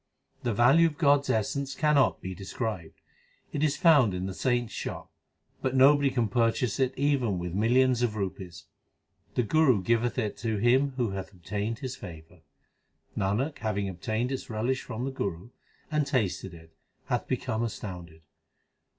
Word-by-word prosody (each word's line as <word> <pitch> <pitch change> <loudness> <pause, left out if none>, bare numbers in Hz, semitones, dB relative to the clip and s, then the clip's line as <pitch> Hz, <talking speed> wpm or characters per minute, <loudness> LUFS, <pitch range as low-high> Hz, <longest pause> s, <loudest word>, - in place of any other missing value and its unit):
The 120 - -1
value 135 +9 +5
of 150 -3 -6
God 145 -3 +5
s 140 - -9
essence 135 +6 -1
cannot 150 -5 +2
be 95 - -4
described: 95 -1 -5 0.6
It 145 - -1
is 150 -1 +1
found 145 - +5
in 90 +1 -3
the 95 - -4
saints 120 +2 -1
shop; - - -6 0.5
But 130 0 -1
nobody 140 +1 +6
can 120 -4 0
purchase 115 +1 +1
it 130 -1 +1
even 130 -8 +1
with 90 -1 -4
millions 120 +4 +3
of 120 -3 0
rupees. 95 -4 -5 0.7
The 125 - +2
Guru 130 -5 +3
giveth 115 +4 +1
it 110 -5 -2
to 110 -2 -2
him 130 +6 +3
who 120 -5 0
hath 95 -1 -5
obtained 100 +5 -4
his 130 - -4
favour. 80 0 -11 0.7
Nanak 115 +11 -1
having 105 -2 -1
obtained 110 +7 -2
its 135 - -5
relish 120 +4 -1
from 120 0 -5
the 135 - -2
Guru, 100 -3 -4 0.4
And 150 -2 +1
tasted 95 - -1
it, 80 -1 -16 0.3
hath 125 - -2
become 120 -3 -2
astounded. 90 -8 -6
115 Hz, 160 wpm, -28 LUFS, 95-130 Hz, 0.7 s, nobody